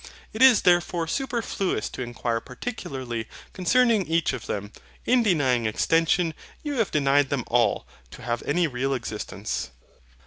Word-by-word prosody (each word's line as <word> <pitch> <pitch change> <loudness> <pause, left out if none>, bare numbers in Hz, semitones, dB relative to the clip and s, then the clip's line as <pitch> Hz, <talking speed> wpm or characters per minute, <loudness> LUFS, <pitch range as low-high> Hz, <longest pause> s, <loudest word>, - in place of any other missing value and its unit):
It 220 - -5
is 260 -3 +7
therefore 175 -1 +2
superfluous 230 - -2
to - - -7
inquire 120 -1 -2
particularly 125 - -6 0.3
concerning 225 +2 +3
each 165 +1 +1
of 125 - -6
them. 105 +1 -4 0.3
In 250 0 +4
denying 135 - +2
extension, 165 - +2 0.3
you 290 -4 -2
have 220 - +2
denied 140 -1 +2
them 140 -4 -1
all 120 -3 +1 0.2
to - - -12
have 120 0 -2
any 170 +4 +2
real 135 -1 -1
existence. 110 -3 -4
145 Hz, 140 wpm, -25 LUFS, 120-195 Hz, 0.3 s, is